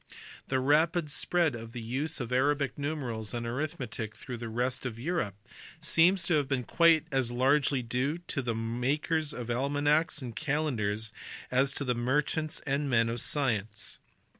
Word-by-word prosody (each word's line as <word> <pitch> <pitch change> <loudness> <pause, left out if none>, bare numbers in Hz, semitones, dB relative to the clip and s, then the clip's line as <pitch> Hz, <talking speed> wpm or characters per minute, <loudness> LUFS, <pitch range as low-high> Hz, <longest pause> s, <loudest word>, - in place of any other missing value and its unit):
The 130 - +1
rapid 155 +3 +2
spread 170 -1 +1
of 115 -1 -8
the 125 - -5
use 135 +8 -2
of 120 -1 -4
Arabic 140 +1 +1
numerals 130 -8 -3
and 120 0 -3
arithmetic 120 -4 -4
through 125 - -6
the 115 -1 -6
rest 125 +3 -1
of 120 -4 -4
Europe 125 - -2 0.4
seems 170 +3 +5
to 175 - +1
have 145 -2 0
been 135 -2 0
quite 165 +4 +4
as 135 -3 +2
largely 130 +2 +2
due 125 +6 -1
to 175 -4 -3
the 120 -3 -2
makers 140 +7 -1
of 120 -4 -5
almanacks 145 +5 +1
and 120 -5 -6
calendars 110 -8 -1 0.4
as 135 +2 +3
to 135 -4 0
merchants 150 +6 0
and 140 0 0
men 115 -2 +3
of 115 0 -2
science. 110 - -1
130 Hz, 160 wpm, -30 LUFS, 120-150 Hz, 0.4 s, seems